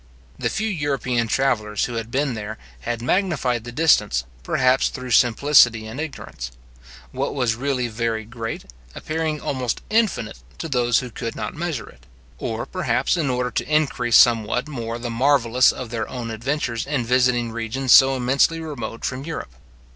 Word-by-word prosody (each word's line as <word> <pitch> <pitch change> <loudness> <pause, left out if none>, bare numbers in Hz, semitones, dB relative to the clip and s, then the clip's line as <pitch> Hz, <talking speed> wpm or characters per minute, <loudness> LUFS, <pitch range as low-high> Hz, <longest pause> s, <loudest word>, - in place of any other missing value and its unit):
The - - 0
few 220 +2 -2
European 140 - -1
travellers 110 -5 0
who 120 - -6
had 115 -1 -4
been 135 +1 0
there, 105 -2 -6 0.2
had 120 - -4
magnified 130 - 0
the 120 - -6
distance, 110 - +3 0.2
perhaps 130 - +2
through 125 -1 -7
simplicity 120 -1 +5
and 110 +5 -7
ignorance; 100 - -6 0.6
what - - -3
was 125 -5 +1
really 130 +1 -1
very 115 -1 -2
great, 115 0 -6 0.3
appearing 155 -1 -2
almost 130 -5 -2
infinite 210 - 0 0.2
to - - -4
those 120 -4 +2
who 125 - -9
could 115 0 -5
not - - -4
measure 160 -6 -4
it; - - -18 0.3
or, - - -3
perhaps, - - 0
in 160 -6 0
order 125 0 -1
to - - -3
increase 135 -6 +2
somewhat 120 +2 +4
more 115 -5 -4
the 120 0 -5
marvellous 125 0 +4
of 125 -3 -7
their 115 -2 -3
own 120 -3 -5
adventures 120 +1 -2
in 140 -5 -1
visiting 125 -1 +2
regions 115 +3 +1
so 135 0 +7
immensely 135 +6 +2
remote 120 -8 -6
from 130 +1 -3
Europe. 150 - -6
125 Hz, 160 wpm, -22 LUFS, 115-140 Hz, 0.6 s, so